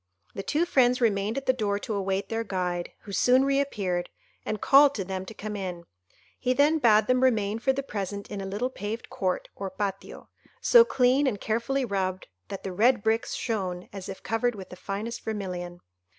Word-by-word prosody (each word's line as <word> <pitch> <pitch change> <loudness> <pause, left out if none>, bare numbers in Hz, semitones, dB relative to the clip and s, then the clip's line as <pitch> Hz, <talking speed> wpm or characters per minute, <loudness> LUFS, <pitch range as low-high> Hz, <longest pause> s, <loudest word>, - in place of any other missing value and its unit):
The - - -4
two 305 - +1
friends 250 -6 +3
remained 215 -1 +1
at 275 - -3
the 260 - +4
door 210 -5 -1
to 215 - -4
await 195 -1 -1
their 225 0 -1
guide, 180 -4 -2
who 205 - -10
soon 255 +7 +4
reappeared, 210 -11 0 0.3
and 215 - -3
called 280 +4 +6
to 195 - -2
them 190 0 -5
to 220 - -9
come 210 0 -5
in. 180 -3 -5 0.6
He 255 - +1
then 295 +4 +3
bade 220 -5 +5
them 255 +2 +2
remain 220 -4 +2
for 265 +3 +2
the 275 +1 -3
present 200 -4 -5
in 200 -1 -4
a 195 - -5
little 215 +7 -2
paved 220 0 -5
court, 185 -1 -2
or 195 -1 -4
patio, 195 0 -5 0.3
so 475 -1 +7
clean 265 - +3
and 210 -6 -1
carefully 235 +6 -1
rubbed 190 -3 -2 0.2
that 195 - -7
the 190 - -4
red 230 +3 +3
bricks 225 +1 0
shone 185 -6 -3
as 195 -1 -7
if 190 - -8
covered 235 +1 0
with 190 -2 -9
the - - -9
finest 210 +5 -5
vermilion. 180 -5 -5
210 Hz, 195 wpm, -27 LUFS, 195-250 Hz, 0.6 s, so